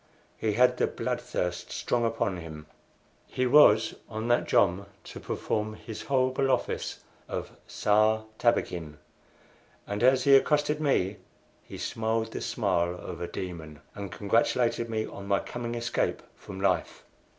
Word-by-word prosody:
He 110 -1 -1
had 125 +4 +4
the - - +2
blood - - -3
thirst 90 0 -3
strong 120 -1 -1
upon 115 -4 -1
him. 80 -3 -9 0.6
He 130 - -1
was 125 -5 +6 0.2
on 110 +1 -4
that 120 - +2
jom 95 +3 +2 0.2
to - - -9
perform 110 0 -2
his 110 0 -8
horrible 130 0 +1
office 130 -2 -1 0.3
of - - -4 0.2
Sar 110 +1 +2 0.2
Tabakin, 85 -10 0 0.9
and 100 0 -4
as 130 +1 +4
he 140 -1 +7
accosted 150 +2 +2
me 105 -9 +1 0.4
he - - -10
smiled 115 0 -2
the - - -5
smile 85 +1 0
of 90 - -8
a 85 - -2
demon, 80 -5 -7
and 100 -2 -7
congratulated 115 +3 +1
me 110 -1 -1
on 100 0 -9
my 100 0 +3
coming 120 -1 -5
escape 120 +1 -1
from 95 -2 -10
life. 95 -1 0
110 Hz, 145 wpm, -28 LUFS, 95-120 Hz, 0.9 s, he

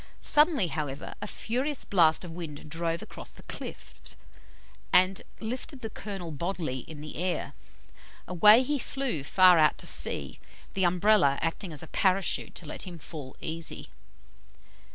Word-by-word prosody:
Suddenly, 300 - +3
however, 145 -3 -4
a - - -4
furious 260 +7 -2
blast 165 -4 +3
of 170 - -8
wind 160 -4 -8
drove 165 0 -2
across - - -8
the - - -15
cliff, - - -8 1.0
and 185 +1 +4 0.2
lifted 255 +4 -6
the 225 -2 -5
Colonel 195 -6 -6
bodily 155 -3 -3
in 150 +3 -10
the 155 - -8
air. 180 +2 -2 0.7
Away 210 +7 +7
he 290 +2 -1
flew 265 - -2
far 180 +3 +6
out 155 -1 +4
to - - -6
sea, - - +1 0.3
the 190 -1 +1
Umbrella 180 -5 +4
acting 165 +2 -2
as 150 -1 -1
a - - -9
Parachute 190 +2 +2
to 175 - -6
let 155 - -5
him 175 -2 -8
fall 145 -3 -9
easy. 160 0 -4
175 Hz, 150 wpm, -28 LUFS, 160-210 Hz, 1.0 s, Away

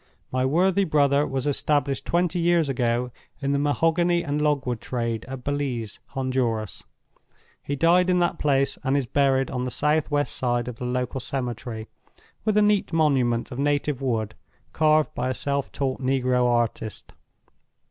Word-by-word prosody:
My 130 0 +1
worthy 185 +7 +3
brother 145 -3 +2
was 135 -1 -2
established 145 -1 0
twenty 175 0 +1
years 170 -3 +2
ago 125 -1 0 0.3
in 140 0 -1
the 140 - +1
mahogany 165 +4 +2
and 150 -2 -2
logwood 135 -6 0
trade 115 -3 -3
at 130 -1 -7
Belize, 135 -7 -3 0.2
Honduras. 125 -6 -1 0.8
He 145 - -3
died 175 +5 +4
in 180 - +3
that 175 -1 +1
place; 140 -2 +1
and 135 +2 +1
is 140 - 0
buried 135 +1 +1
on 125 -1 -2
the 125 - -2
south 150 +5 +1
west 145 -1 0
side 120 -1 0
of 125 -2 -6
the 125 - -5
local 125 +1 -2
cemetery, 120 -4 -4 0.6
with 215 -1 +1
a 210 - +5
neat 210 -3 +2
monument 135 -8 +1
of 125 - -6
native 145 -1 0
wood 110 -5 -1 0.4
carved 155 0 +3
by 125 - -2
a 130 - -1
self 140 -1 -2
taught 135 -1 -2
negro 130 -1 +2
artist. 120 -2 -2
135 Hz, 160 wpm, -24 LUFS, 125-150 Hz, 0.8 s, a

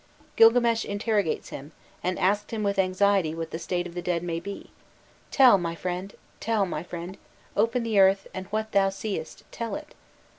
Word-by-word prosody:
Gilgames 230 0 +5
interrogates 205 -3 -1
him, 145 +4 -9 0.3
and 180 0 -1
asks 200 +2 +1
him 220 -2 -2
with 200 -1 0
anxiety 185 -3 +2
what 165 -1 -5
the 165 - -4
state 175 +1 -2
of 175 - -8
the 175 - -4
dead 175 -1 -1
may 165 -1 -2
be: 200 +4 -8 0.6
"'Tell, 250 -7 +6
my 170 -1 -3
friend, 180 +3 -4 0.2
tell, 220 -3 +1
my 155 -4 -4
friend, 175 +2 -8 0.4
open 230 +3 +1
the 220 -3 +1
earth 195 0 +5
and 190 0 -6
what 215 +2 -3
thou 195 -1 +3
seest 195 -4 -5
tell 230 -1 -4
it. 300 0 -9
195 Hz, 180 wpm, -26 LUFS, 175-215 Hz, 0.6 s, Tell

